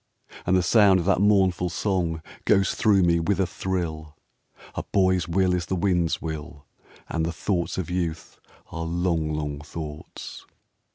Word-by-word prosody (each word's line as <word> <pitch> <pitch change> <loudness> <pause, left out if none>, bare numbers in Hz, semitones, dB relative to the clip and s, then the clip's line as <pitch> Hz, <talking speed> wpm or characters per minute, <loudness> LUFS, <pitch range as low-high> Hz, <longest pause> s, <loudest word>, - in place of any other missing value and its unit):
And 95 +1 +4
the 90 - +2
sound 100 0 +5
of 85 - -3
that 95 0 +2
mournful 95 -3 +3
song 85 -2 -1 0.2
Goes 100 -1 +3
through 100 -4 +3
me 85 -1 +3
with 95 +4 0
a 95 - +3
thrill: 80 -5 -4 0.6
"A - - -3
boy's 95 -3 +1
will 90 +1 +2
is 85 -3 -1
the 95 - -1
wind's 90 -2 +1
will, 80 -2 -7 0.4
And 80 - -2
the 85 - -1
thoughts 85 +2 -2
of 90 -2 -3
youth 85 -3 -3 0.3
are 85 - -5
long, 85 -2 0
long 75 -1 -3
thoughts.' 75 0 -8
85 Hz, 160 wpm, -25 LUFS, 80-95 Hz, 0.6 s, sound